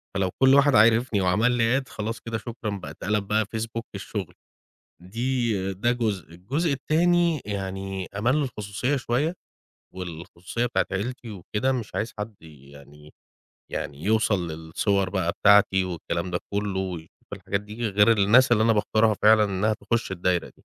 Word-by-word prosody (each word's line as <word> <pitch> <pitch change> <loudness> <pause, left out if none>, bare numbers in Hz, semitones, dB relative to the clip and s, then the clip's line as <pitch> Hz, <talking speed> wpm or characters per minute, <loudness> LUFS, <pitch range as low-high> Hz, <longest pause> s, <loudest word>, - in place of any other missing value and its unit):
فلو 95 -1 +1
كل 130 0 +6
واحد 140 -2 +5
عرفني 115 0 +4
وعمل 100 +7 +2
لي 120 +2 +2
Add 130 - -16
خلاص 115 +2 -4
كدة 115 -1 -4
شكرًا 115 0 -6
بقى 95 - -8
اتقلب 105 0 -2
بقى 110 +1 +1
Facebook 115 +1 -3
الشغل. 100 -2 -5 0.7
دي 115 -1 -1
ده 120 +6 0
جزء، 110 -8 -2
الجزء 140 - -2
التاني 170 +2 +2
يعني، 95 -1 -4
أمان 120 +7 +2
للخصوصية 125 -2 -2
شوية، 135 +5 0 0.6
والخصوصية 90 +5 -5
بتاعة 120 - 0
عيلتي 115 +4 -4
وكدة، 105 +7 -2
مش 120 -5 -4
عايز 115 - -2
حد 105 +1 -5
يعني 70 0 -15 0.6
يعني 70 +2 -5
يوصل 105 -3 +1
للصور 90 +5 -1
بقى 90 -3 0
بتاعتي 100 -1 +4
والكلام 85 0 -4
ده 90 - -1
كله، 100 -2 -1
ويشوف 90 -3 -7
الحاجات 100 0 -3
دي، 110 +3 -4
غير 105 +3 +4
الناس 115 +5 +5
اللي 110 -2 +4
أنا 115 0 +4
باختارها 110 +1 +2
فعلًا 110 0 +6
إنها 100 +2 0
تخش 115 -1 -2
الدايرة 90 -1 -1
دي. - - -26
105 Hz, 155 wpm, -25 LUFS, 95-115 Hz, 0.7 s, كل